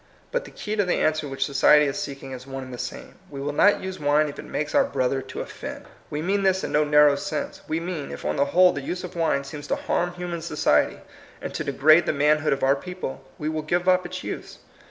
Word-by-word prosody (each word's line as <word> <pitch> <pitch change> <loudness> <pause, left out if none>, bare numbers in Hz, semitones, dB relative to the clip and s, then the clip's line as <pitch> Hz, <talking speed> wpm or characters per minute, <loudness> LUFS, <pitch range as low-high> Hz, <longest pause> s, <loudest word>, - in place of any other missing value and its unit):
But - - -1
the - - -10
key 215 0 -5
to 205 - +2
the 180 - +1
answer 155 -1 +1
which 135 -1 -1
society 150 +1 +5
is 140 -1 -2
seeking 135 -1 -6
is 130 0 -8
one 135 0 -5
and 130 0 -9
the 120 - -7
same. - - -7
We 140 - -7
will 145 +1 -3
not 205 +7 +4
use 190 0 -5
wine 150 +1 +2
if 140 - -9
it - - -7
makes 150 0 -3
our 285 - +5
brother 135 - 0
to 130 - -7
offend. - - -7 0.2
We 150 +1 -3
mean 200 +3 +1
this 190 -1 +2
in - - -3
no 150 - +3
narrow 150 -1 +5
sense. 140 - -4
We 160 +1 -1
mean, 170 -4 -5
if - - -8
on - - 0
the 140 - +2
whole 180 +5 +5
the 145 - -4
use 180 +6 -4
of 180 0 -7
wine 165 -4 +1
seems 145 +1 -8
to - - +1
liarm 175 0 -1
human 175 -1 -4
society, 150 - +1 0.4
and - - -6
to - - -3
degrade 155 +4 +4
the - - +2
man 150 +1 +3
hood 155 - 0
of 135 - 0
our 135 +1 +4
people, 180 -1 -6
we 150 - -4
will 155 0 -1
give 175 +4 -1
up 185 0 +4
its 185 +1 -7
use. - - -6
150 Hz, 260 wpm, -24 LUFS, 140-180 Hz, 0.4 s, society